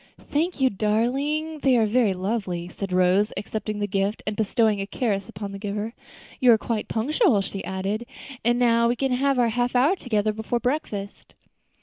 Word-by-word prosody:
"Thank 325 +3 0
you, 260 -1 +3
darling, 270 +10 0
they 265 -3 +3
are 225 - +4
very 215 -3 +2
lovely," 185 -3 -2
said 195 +1 -6
Rose, 185 +3 +3
accepting 215 +1 -4
the 205 - -1
gift 200 +1 -1
and 210 - -2
bestowing 220 -1 +1
a 195 - -4
caress 200 -5 -2
upon 200 +1 -6
the 200 - -7
giver. 210 +2 -4 0.5
"You 250 -3 +6
are - - +4
quite 220 0 -3
punctual," 270 - +2
she 195 0 -5
added, 195 +5 -3 0.4
"and 240 +2 +3
now 235 -1 +3
we 240 - +1
can 270 +1 -1
have 270 +2 +2
our 240 -2 +3
half 245 +2 -1
hour 280 +10 +4
together 215 - 0
before 220 +2 -2
breakfast." 230 -6 -4
220 Hz, 185 wpm, -24 LUFS, 200-250 Hz, 0.5 s, You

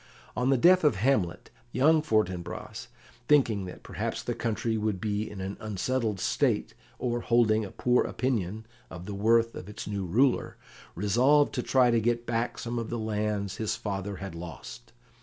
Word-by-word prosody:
On 125 +1 +1
the 135 - +4
death 180 +7 +5
of 150 -7 +4
Hamlet, 100 -5 0 0.2
young 155 +5 +4
Fortinbras, 105 - -2 0.4
thinking 115 -10 +3
that 90 - -10
perhaps - - -4
the - - -2
country 115 0 -1
would 105 -3 -1
be 105 +1 -2
in 105 - -9
an 95 +1 -5
unsettled 110 +1 -2
state, - - 0 0.2
or 120 -1 -1
holding 110 -2 +3
a 100 - -6
poor 125 +4 +2
opinion 110 -4 -2 0.2
of 90 - -9
the 105 - -5
worth 115 +3 +3
of 90 - -8
its 105 - -7
new 100 -2 -3
ruler, 125 +9 +2 0.4
resolved 125 - +3
to 125 - -1
try 125 -1 +3
to 115 -1 +2
get 120 +1 0
back 115 +1 -1
some 120 0 -3
of 115 - -4
the 120 - -3
lands 105 -2 -2
his 110 -2 -1
father 100 -1 -4
had 95 -1 -7
lost. 65 -8 -9
110 Hz, 175 wpm, -28 LUFS, 100-120 Hz, 0.4 s, death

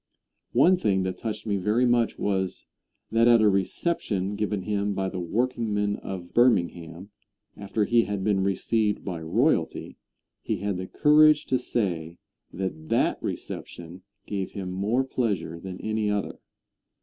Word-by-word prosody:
One 175 +10 +5
thing 95 - +1
that 95 0 -3
touched 110 -1 -5
me 100 -2 0
very 105 +6 +2
much 120 -2 +2
was, 95 -2 -2 0.5
that 115 +1 +4
at 120 -1 +7
a 110 - +4
reception 100 - 0
given 105 -2 -2
him 100 0 -1
by 95 0 -1
the 95 - -5
workingmen 105 +1 -1
of 90 -2 -7
Birmingham, 90 -5 +1 0.4
after 105 +1 -1
he 115 +1 +3
had 100 -2 -3
been 100 -1 +2
received 105 +2 0
by 90 -4 -4
royalty, 80 - 0 0.4
he - - -2
had 100 -2 -2
the 95 0 -5
courage 150 +3 +5
to 130 - +1
say 85 -9 -2 0.3
that 80 -4 -5
that - - +1
reception 85 +2 -6 0.2
gave 95 -3 -4
him 95 -2 -5
more 105 +8 0
pleasure 100 -11 -2
than 95 +1 -8
any 110 -1 -1
other. 105 -1 -2
100 Hz, 150 wpm, -26 LUFS, 95-115 Hz, 0.5 s, at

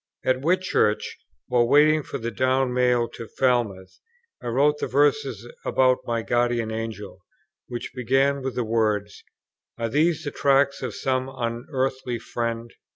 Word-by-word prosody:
At 130 0 +2
Whitchurch, 170 -10 +1 0.3
while 120 -1 +2
waiting 155 +3 +5
for 140 - -6
the 115 -2 -4
down 130 0 +1
mail 125 -1 +2
to 115 - -9
Falmouth, 115 -8 0 0.4
I - - -6
wrote 145 +5 +2
the - - -2
verses 140 -5 +1 0.2
about 130 -1 +3
my 115 -1 -1
Guardian 120 -2 0
Angel, 110 -4 -6 0.5
which 120 -1 -6
begin 135 +3 +1
with 130 -1 -4
these 125 - 0
words: 105 -2 -1 0.5
"Are 115 0 -2
these 160 +5 +1
the 145 - -4
tracks 140 0 +2
of - - -4
some 130 0 -1
unearthly 130 +1 -2
Friend?" 115 0 -4
125 Hz, 145 wpm, -24 LUFS, 115-135 Hz, 0.5 s, waiting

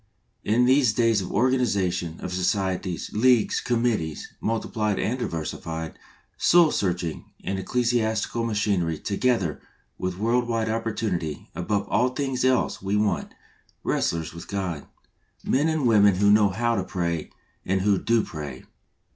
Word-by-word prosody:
In 115 +4 +3
these 130 -3 +4
days 115 -3 +2
of 90 - -6
organisation, 100 -9 +1
of 90 - -5
societies, 90 -1 -1
leagues, 120 +1 +3
committees, 115 - -1
multiplied 110 -2 -1
and 125 +4 -1
diversified, 80 -3 -4 0.4
soul 170 -3 +5
saving 90 -4 -2 0.2
and 95 0 -2
ecclesiastical 115 +1 0
machinery, 100 -7 0
together 100 - 0 0.4
with 90 -1 -3
world 120 +4 +1
wide 115 -2 -1
opportunity, 105 -9 -3
above 100 +3 -1
all 125 +2 +2
things 130 0 -2
else 130 0 +1
we 100 +2 -1
want 105 -1 -1 0.2
" - - -37
wrestlers 80 -1 -1
with 85 - -9
God 95 -7 -4 0.3
— - - -38
men 145 +5 +2
and 160 -4 0
women 105 -4 +5
who 100 +2 +4
know 105 -1 +5
how 120 +4 0
to 95 - 0
pray 85 -3 -2 0.3
and 95 0 0
who 100 0 +2
do 115 -2 +2
pray. 75 -5 -7
105 Hz, 140 wpm, -25 LUFS, 90-120 Hz, 0.4 s, soul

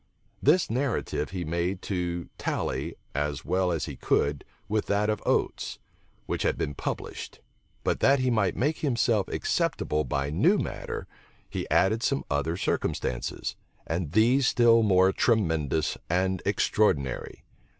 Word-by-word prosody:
This 165 +6 +4
narrative 125 - -1
he 90 -2 -4
made 85 +4 -2
to 85 -3 -2
tally, - - -2 0.2
as 75 -1 -2
well 90 -1 +1
as 80 -3 -1
he - - -6
could, 70 0 0 0.2
with 110 0 -1
that 105 +1 +2
of 105 - -3
Oates, - - 0 0.5
which - - -2
had - - +1
been 75 - -2
published: - - -5 0.4
but - - 0
that 140 +1 +5
he 130 -1 +1
might 110 -5 +1
make 150 +5 0
himself 120 -7 +1
acceptable 75 0 0
by 70 -1 -2
new 75 - +4
matter, - - -4 0.4
he - - -5
added 110 +4 +3
some 140 +2 0
other 75 +4 0
circumstances, - - -2 0.3
and 80 -2 -3
these 120 +5 +4
still 115 -1 +5
more 95 -3 +4
tremendous 80 - +1
and 95 +1 +1
extraordinary. 95 -8 +1
95 Hz, 140 wpm, -27 LUFS, 80-115 Hz, 0.5 s, that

